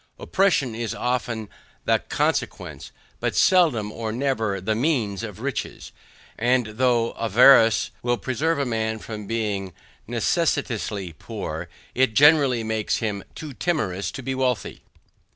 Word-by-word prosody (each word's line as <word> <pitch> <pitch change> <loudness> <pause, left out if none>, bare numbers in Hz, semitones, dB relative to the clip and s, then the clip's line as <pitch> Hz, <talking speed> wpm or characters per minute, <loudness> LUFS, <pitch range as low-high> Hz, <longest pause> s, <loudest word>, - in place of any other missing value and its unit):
Oppression 170 - +1
is 115 0 -4
often 120 -3 -2 0.4
the - - +3
CONSEQUENCE, - - -2 0.3
but - - -1
seldom 155 - +3
or 110 0 -4
never 115 -5 -1
the 105 +4 -1
MEANS 115 - 0
of 110 -2 -7
riches; 135 -3 -4 0.5
and 125 +2 +2
though 115 +1 +1
avarice 115 +1 +5
will 120 0 0
preserve 145 +9 -1
a 140 - 0
man 110 -2 -1
from 105 -2 -8
being 105 -5 -2 0.3
necessitously 95 -5 -1
poor, - - -6 0.2
it 125 -4 +2
generally 140 -5 +5
makes 110 -1 -1
him 105 -4 -3
too 155 -3 -7
timorous 110 - -1
to 130 - -7
be 135 - -2
wealthy. 130 -3 -1
115 Hz, 130 wpm, -24 LUFS, 110-130 Hz, 0.5 s, avarice